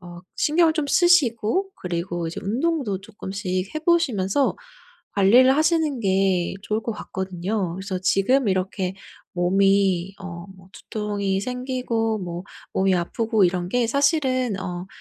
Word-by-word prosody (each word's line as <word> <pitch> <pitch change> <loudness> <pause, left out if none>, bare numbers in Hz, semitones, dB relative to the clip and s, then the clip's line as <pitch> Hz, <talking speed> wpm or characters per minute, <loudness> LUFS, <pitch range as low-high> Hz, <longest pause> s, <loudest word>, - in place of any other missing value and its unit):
어 175 0 -10
신경을 320 +1 +3
좀 305 -3 -1
쓰시고 345 - +3
그리고 175 -1 -3
이제 165 - -5
운동도 245 - -1
쪼끔씩 195 -2 -4
해 - - 0
보시면서 280 - +1 0.6
관리를 245 +7 +5
하시는 310 -4 +1
게 190 -3 +1
좋을 215 +1 -2
것 230 - -3
같거든요. 190 -1 -3
그래서 190 -1 -4
지금 210 +6 +2
이렇게 185 0 -1 0.4
몸이 195 0 +2
어 170 -2 -8
뭐 185 0 -18
두통이 205 -2 -3
생기고 250 -2 -2
뭐 175 0 -6 0.3
몸이 190 0 +2
아프고 215 +4 +1
이런 175 0 0
게 245 +2 +1
사실은 260 - +1
어 180 0 -5
200 Hz, 275 characters per minute, -23 LUFS, 185-255 Hz, 0.6 s, 관리를